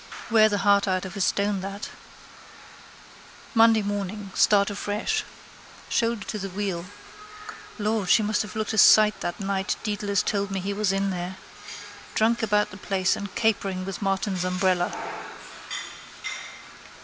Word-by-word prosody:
Wear 215 -1 +6
the 205 - 0
heart 200 0 +3
out 185 0 0
of 190 +1 -7
a 200 - -3
stone, 200 +1 +1
that. 195 +2 -6 1.6
Monday 225 -2 +5
morning. 200 0 -4
Start 205 -1 +4
afresh. 210 - -1 0.7
Shoulder 230 -3 0
to 215 - -4
the 195 0 -4
wheel. 190 -3 -3 0.9
Lord, 210 -3 -1
she 220 - +5
must 210 0 +1
have 210 -2 -7
looked 215 0 -2
a 220 - +2
sight 215 +2 +7
that 175 - -4
night 195 0 -1
Dedalus 205 -2 0
told 200 -1 -1
me 195 -1 -2
he 195 +2 -3
was 205 -1 +1
in 195 0 0
there. 180 +1 -4 0.8
Drunk 230 +2 +2
about 210 -1 +1
the 190 - -9
place 190 -2 0
and 200 -1 -7
capering 195 -4 0
with 195 +1 -6
Martin's 195 -1 -1
umbrella. 180 -1 +1
200 Hz, 145 wpm, -25 LUFS, 190-215 Hz, 1.6 s, sight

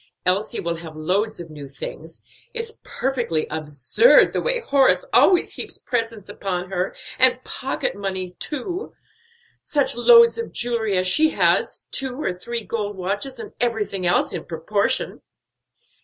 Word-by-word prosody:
Elsie 195 +5 0
will 170 0 -2
have 165 -1 -9
loads 190 +8 -1
of 165 -2 -9
new 145 -2 -9
things; 155 +4 -9 0.3
it's 460 -1 -4
perfectly 240 -12 -1
absurd 155 - +4
the - - 0
way - - +2
Horace 280 - +3 0.5
heaps - - -6
presents 230 -4 -3
upon 190 -3 -4
her, 185 0 -2 0.2
and 255 0 +5
pocket 265 +1 -3
money 190 -2 -3
too. 310 - -5 0.7
Such 285 -5 0
loads 465 - +6
of 460 - -4
jewelry 230 -5 0
as 185 0 +1
she 310 +11 +4
has, - - +1
two 265 -1 -3
or 190 - -1
three 230 +6 -5
gold 205 -2 -4
watches, 200 +8 -3
and 440 -3 -9
everything 210 -6 -1
else 175 - +2
in - - -5
proportion." 175 +5 -1
210 Hz, 140 wpm, -22 LUFS, 180-265 Hz, 0.7 s, loads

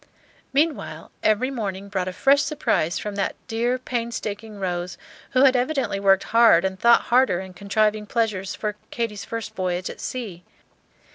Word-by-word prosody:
Meanwhile, 300 +3 -1
every 225 +5 +2
morning 200 -6 -4
brought 190 -2 -2
a - - -2
fresh 275 +8 +4
surprise 285 - 0
from 210 - -4
that 195 - -1
dear, 235 +3 0
painstaking 230 -4 -4
Rose, 180 -2 -3 0.4
who 255 +1 +5
had 265 -1 +6
evidently 255 -4 0
worked 195 -1 +4
hard 230 -6 +6
and 190 0 -2
thought 235 +2 +6
harder 250 -8 +4
in 190 -1 -8
contriving 210 +2 0
pleasures 210 -5 -1
for 210 -1 -3
Katy's 210 -4 -3
first 225 -1 -5
voyage 185 -2 -2
at - - -11
sea. 205 -9 -5
215 Hz, 155 wpm, -23 LUFS, 190-240 Hz, 0.4 s, had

